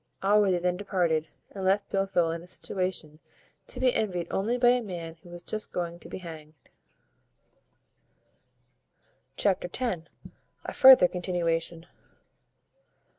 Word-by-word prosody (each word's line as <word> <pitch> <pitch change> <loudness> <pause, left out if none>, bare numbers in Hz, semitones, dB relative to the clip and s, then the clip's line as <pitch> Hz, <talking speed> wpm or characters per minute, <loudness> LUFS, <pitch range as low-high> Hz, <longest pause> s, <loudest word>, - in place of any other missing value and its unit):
Allworthy 200 -2 +4
then 180 0 -1
departed, 175 -5 0 0.2
and 195 - -7
left 195 +2 +1
Blifil 195 -4 +1
in 165 0 -5
a 175 - -14
situation 180 -5 -4 0.5
to 250 - -7
be 255 -1 +3
envied 180 -5 -1
only 225 +6 0
by 245 -1 +5
a 250 0 +3
man 170 -6 -7
who 175 - -15
is 175 0 -10
just 215 0 -5
going 170 -1 -4
to - - -11
be - - -6
hanged. 160 -4 -10 2.8
Chapter 190 -3 +1
ix. 180 -5 -3 0.6
A - - -5
further 260 -8 +8
continuation. 170 -2 -2
180 Hz, 125 wpm, -28 LUFS, 170-200 Hz, 2.8 s, further